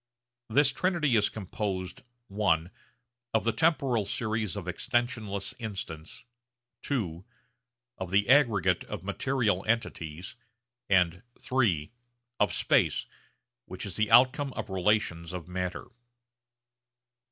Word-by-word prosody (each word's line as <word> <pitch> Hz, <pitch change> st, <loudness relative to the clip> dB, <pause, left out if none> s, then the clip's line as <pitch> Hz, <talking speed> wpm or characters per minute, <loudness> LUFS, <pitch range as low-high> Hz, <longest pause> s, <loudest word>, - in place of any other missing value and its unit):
This 145 Hz, +6 st, +4 dB
trinity 170 Hz, -8 st, +1 dB
is 105 Hz, -2 st, +3 dB
composed 95 Hz, -2 st, -4 dB, 0.3 s
(i) 90 Hz, -6 st, +2 dB, 0.7 s
of 110 Hz, -, +3 dB
the 115 Hz, -, +2 dB
temporal 135 Hz, -4 st, +2 dB
series 110 Hz, -1 st, -1 dB
of 100 Hz, -4 st, -5 dB
extensionless 105 Hz, 0 st, -1 dB
instants, 95 Hz, -8 st, -6 dB, 0.6 s
(ii) 95 Hz, -, -1 dB, 0.8 s
of 95 Hz, -2 st, -4 dB
the 100 Hz, +2 st, +2 dB
aggregate 110 Hz, -, +4 dB
of 105 Hz, -5 st, -6 dB
material 105 Hz, -1 st, 0 dB
entities, 90 Hz, -7 st, -2 dB, 0.5 s
and 90 Hz, -2 st, +3 dB, 0.3 s
(iii) 95 Hz, -, +2 dB, 0.5 s
of -, -, +3 dB
space -, -, +2 dB, 0.6 s
which -, -, -6 dB
is -, -, -6 dB
the 110 Hz, -1 st, +1 dB
outcome 130 Hz, +2 st, +5 dB
of 110 Hz, -2 st, -5 dB
relations 90 Hz, -3 st, 0 dB
of 90 Hz, -3 st, -6 dB
matter. 90 Hz, 0 st, -4 dB
105 Hz, 105 wpm, -29 LUFS, 90-120 Hz, 0.8 s, outcome